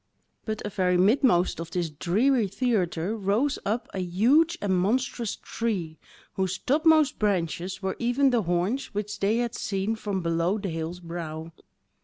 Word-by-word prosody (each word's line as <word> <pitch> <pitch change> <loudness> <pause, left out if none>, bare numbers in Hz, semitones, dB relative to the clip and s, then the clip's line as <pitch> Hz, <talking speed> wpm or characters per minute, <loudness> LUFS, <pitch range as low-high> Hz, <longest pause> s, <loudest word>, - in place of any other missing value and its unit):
But 215 -2 -4
a - - -2
very 185 -3 +1
midmost 195 - +3
of 165 0 -5
this 170 -2 -2
dreary 210 - +2
theatre 195 -4 -1
rose 220 +8 0
up 230 +3 -1
a 190 - -3
huge 250 - +3
and 195 -2 0
monstrous 230 +4 0
tree, 185 -9 -3 0.3
whose 190 -1 -1
topmost 310 +1 +3
branches 185 -1 -1
were 190 0 -2
even 250 +3 +2
the 240 -2 +2
horns 185 +8 -1
which 210 0 -3
they 205 +3 +2
had 240 -1 -1
seen 200 +3 -2
from 200 -4 -3
below 170 +4 +1
the 200 -2 -4
hill's 165 +2 -4
brow. 165 -1 -6
200 Hz, 155 wpm, -26 LUFS, 175-235 Hz, 0.3 s, midmost